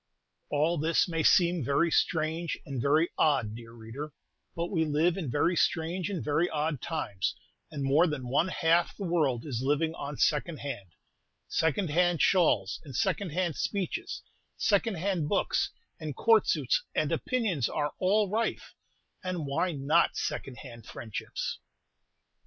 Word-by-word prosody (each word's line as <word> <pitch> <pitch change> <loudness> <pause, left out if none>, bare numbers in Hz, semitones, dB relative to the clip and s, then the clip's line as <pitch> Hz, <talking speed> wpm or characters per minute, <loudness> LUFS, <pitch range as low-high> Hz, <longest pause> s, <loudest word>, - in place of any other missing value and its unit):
All 155 +3 +1
this 160 +2 +2
may 165 -2 -1
seem 170 -1 +4
very 145 +6 +2
strange 160 0 0
and 135 -3 -4
very 150 +5 +3
odd, 135 -9 +2
dear 115 0 -10
reader; 120 +6 -8 0.4
but 170 +1 -3
we 165 -5 +2
live 160 +3 +2
in 170 -8 -3
very 160 +7 +2
strange 170 +2 0
and 190 -5 -3
very 155 +4 +2
odd 150 -2 -1
times, 105 - -2 0.3
and 145 -3 -5
more 145 +6 +4
than 145 -5 -4
one 140 +8 +2
half 170 -1 +2
the 200 - -5
world 150 -9 +1
is 125 -6 -3
only 140 +3 +3
living 160 +2 -1
on 145 -3 -6
"second 155 +1 +1
hand," 100 -11 -6 0.5
second 160 +1 0
hand 175 +1 +2
shawls 145 - +3
and 140 -5 -10
second 200 - 0
hand 170 0 -1
speeches, 200 -4 -3 0.3
second 210 0 +2
hand 170 -3 -1
books, - - +1 0.3
and 155 -3 -5
Court 225 - +4
suits - - +2
and - - +1
opinions 210 - 0
are 150 -1 -2
all 205 +3 +3
rife; 220 +4 -2 0.5
and 180 -4 -3
why 140 +6 0
not 150 +3 +2
second 130 - -3
hand 115 -2 -11
friendships? 110 -3 -5
160 Hz, 155 wpm, -29 LUFS, 140-175 Hz, 0.5 s, seem